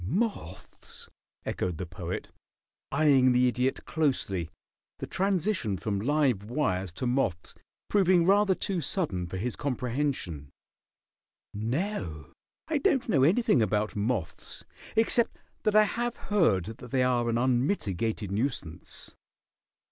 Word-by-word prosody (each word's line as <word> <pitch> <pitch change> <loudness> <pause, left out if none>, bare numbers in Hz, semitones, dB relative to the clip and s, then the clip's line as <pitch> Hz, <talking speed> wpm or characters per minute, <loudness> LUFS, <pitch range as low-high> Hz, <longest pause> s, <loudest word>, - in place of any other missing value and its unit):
"Moths?" 155 - -4 0.4
echoed 90 -3 -2
the 90 - -4
Poet, 90 0 -6 0.6
eying 135 -3 +4
the 125 +1 +4
Idiot 125 +2 0
closely, 115 - -1 0.5
the - - -5
transition 185 - 0
from 100 +1 -2
live 130 -4 +1
wires 95 - -1
to 125 - -4
moths 120 -10 -1 0.3
proving 185 -4 +4
rather 200 0 +4
too 185 -2 -1
sudden 135 - -1
for 95 - -5
his 115 +5 -2
comprehension. 125 - -2 1.0
"No, 105 - -3 0.3
I 315 -2 0
don't 270 -2 +2
know 150 -10 +3
anything 165 - +4
about 105 0 0
moths 105 -4 -3 0.3
except 225 +1 +3 0.2
that 215 -1 +1
I 215 - +8
have 240 +3 -2
heard 155 - +2
that 125 - -11
they 130 0 +2
are 120 -2 +1
an 115 - +1
unmitigated 115 - 0
nuisance." 100 - -4
125 Hz, 120 wpm, -28 LUFS, -, 1.0 s, I